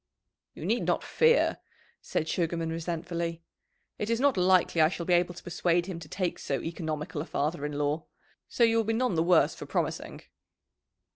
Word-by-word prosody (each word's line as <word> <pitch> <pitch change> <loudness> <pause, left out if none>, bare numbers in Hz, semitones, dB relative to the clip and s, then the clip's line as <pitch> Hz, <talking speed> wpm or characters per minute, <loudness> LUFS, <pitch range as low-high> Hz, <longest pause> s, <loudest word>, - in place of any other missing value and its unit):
"You - - -7
need - - 0
not - - +1
fear," 475 +1 +3 0.4
said 160 - -2
Sugarman 165 -1 -1
resentfully. 170 0 -3 0.6
"It 210 - -2
is 230 0 +1
not 280 0 +3
likely 180 -2 +3
I 155 - +6
shall 170 -1 -5
be 180 - +2
able 175 0 +2
to - - -11
persuade 175 0 +1
him 180 -3 -5
to 155 -2 -11
take 185 -3 -2
so 135 - -2
economical 155 -3 -4
a - - -5
father 150 0 -1
in 150 - -6
law. 145 +2 -1 0.4
So 240 - +1
you 230 0 +4
will 225 - +3
be 225 +1 0
none 245 -1 +1
the 160 - +2
worse 170 0 +4
for - - -9
promising." - - -3
170 Hz, 190 wpm, -29 LUFS, 160-185 Hz, 0.6 s, I